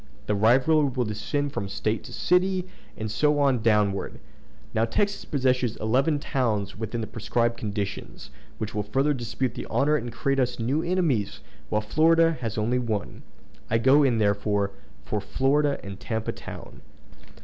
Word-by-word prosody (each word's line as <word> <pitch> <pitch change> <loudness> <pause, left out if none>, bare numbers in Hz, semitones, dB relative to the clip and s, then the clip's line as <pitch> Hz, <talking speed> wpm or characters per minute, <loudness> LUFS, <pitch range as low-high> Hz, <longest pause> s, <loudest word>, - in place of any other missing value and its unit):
The 105 - 0
rivalry 130 +8 +4
will 125 -1 -1
descend 140 +7 -2
from 100 - -3
State 105 +3 -2
to - - -10
city, 185 +1 +1 0.3
and 110 -1 -4
so 150 +6 +2
on 135 -5 +2
downward. 105 -3 +1 0.5
Now 110 - +2
Texas 200 - 0
possesses 130 -4 +1
eleven 135 +8 +1
towns 115 -9 -1
within 110 +2 -4
the - - -2
prescribed 115 +2 -1
conditions, 100 - -5 0.3
which 110 -1 -4
will 105 - -1
further 135 +8 +1
dispute 125 0 -2
the - - -6
honor 150 +2 +2
and 120 -3 -5
create 135 +3 0
us 125 -1 0
new 130 +7 0
enemies, 165 - 0 0.3
while 105 - +1
Florida 165 +8 +4
has 115 -3 -3
only 120 +4 +1
one. 110 -5 -3 0.5
I 115 - +3
go 130 +5 +5
in, 130 -5 +3
therefore, 100 -1 +1 0.3
for 105 - -2
Florida 140 +7 +1
and 100 -1 -8
Tampa 110 -1 -3
Town." - - -10
120 Hz, 160 wpm, -26 LUFS, 105-145 Hz, 0.5 s, go